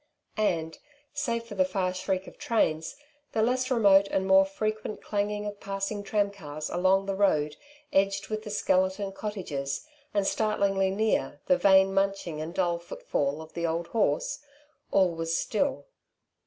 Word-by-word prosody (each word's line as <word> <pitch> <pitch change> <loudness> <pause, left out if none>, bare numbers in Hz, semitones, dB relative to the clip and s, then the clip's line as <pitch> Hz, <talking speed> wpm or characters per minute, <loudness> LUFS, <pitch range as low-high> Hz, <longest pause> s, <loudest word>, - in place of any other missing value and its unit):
And, 165 -6 0 0.3
save 240 -6 -1
for 230 - -10
the 190 -2 +3
far 185 0 -1
shriek 185 0 -2
of - - -13
trains, 160 -8 0 0.4
the 220 - +2
less 255 +2 +1
remote 200 -5 +5
and 190 - 0
more 190 0 +6
frequent 215 +2 -3
clanging 205 0 -2
of 205 -1 -5
passing 195 +1 -3
tramcars 200 -8 -2
along 190 +2 +3
the 195 - -1
road 155 -7 +2 0.4
edged 195 0 +2
with 215 0 -3
the 215 - -8
skeleton 190 0 +1
cottages, 185 - -4 0.3
and, 200 -1 +1
startlingly 200 -3 +1
near, 195 -8 0
the 180 - +4
vain 190 +1 +5
munching 195 -5 0
and 165 +3 -6
dull 175 -2 +1
footfall 150 -3 -2
of 160 - -15
the 170 0 -1
old 170 +1 -2
horse, 215 - 0 0.5
all 190 -2 +4
was 165 0 -1
still. 275 +5 -1
195 Hz, 155 wpm, -28 LUFS, 175-210 Hz, 0.5 s, more